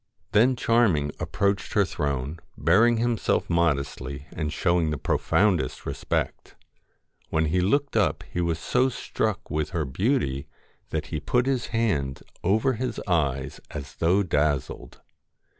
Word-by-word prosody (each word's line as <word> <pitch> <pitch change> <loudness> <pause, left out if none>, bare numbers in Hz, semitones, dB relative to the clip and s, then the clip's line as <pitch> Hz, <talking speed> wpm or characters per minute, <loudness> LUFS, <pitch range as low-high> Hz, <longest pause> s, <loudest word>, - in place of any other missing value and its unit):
Then 120 +5 +4
Charming 110 -12 +2
approached 100 0 -1
her 100 -3 +4
throne, 70 -2 -3 0.2
bearing 115 +8 +4
himself 115 0 +1
modestly, 70 -4 0
and 75 -3 -2
showing 85 -1 +1
the 75 - -1
profoundest 90 -3 +1
respect. - - -3 0.7
When 80 0 +1
he 90 +4 +1
looked 140 +9 +1
up 105 -4 +2
he 90 - -4
was 85 -2 0
so 125 +10 +1
struck 110 -5 -3
with 75 -1 -1
her 80 -3 -1
beauty 70 - 0 0.4
that - - -2
he 75 - 0
put 125 - +1
his 130 -3 0
hand 75 -13 -1 0.2
over 110 +8 +2
his 125 +2 -3
eyes 70 -6 0
as 70 -2 -8
though 90 +5 +3
dazzled. 75 -5 -1
85 Hz, 135 wpm, -26 LUFS, 75-110 Hz, 0.7 s, Then